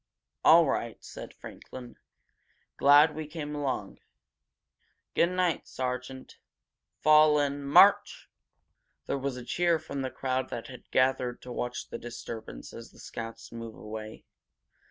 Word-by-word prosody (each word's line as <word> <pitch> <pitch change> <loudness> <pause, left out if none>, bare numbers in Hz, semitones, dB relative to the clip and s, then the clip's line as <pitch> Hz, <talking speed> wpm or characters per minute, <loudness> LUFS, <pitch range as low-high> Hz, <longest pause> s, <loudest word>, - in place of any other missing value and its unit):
"All 165 +1 +8
right," 115 -4 -2
said - - -9
Franklin. 125 -2 -11 0.8
"Glad 145 +3 +6
we 155 -1 -6
came 150 -1 -6
along. 135 -9 -3 1.1
Good 170 - +3
night, 180 -3 0
sergeant. 130 +1 -5 0.6
Fall 155 0 +6
in! 145 0 -1
March!" 140 +1 +5 0.8
There 140 - -2
was 135 -1 -3
a 125 - -8
cheer 170 +5 +2
from 145 -3 -6
the 130 - -2
crowd 130 0 -2
that 115 - -6
had 125 - -12
gathered 130 -1 +1
to 125 - -8
watch 120 0 -4
the - - -6
disturbance 115 - -8
as 115 0 -10
the - - -21
scouts 115 0 -8
move 115 -1 -8
away. 110 0 -8
130 Hz, 135 wpm, -29 LUFS, 120-150 Hz, 1.1 s, All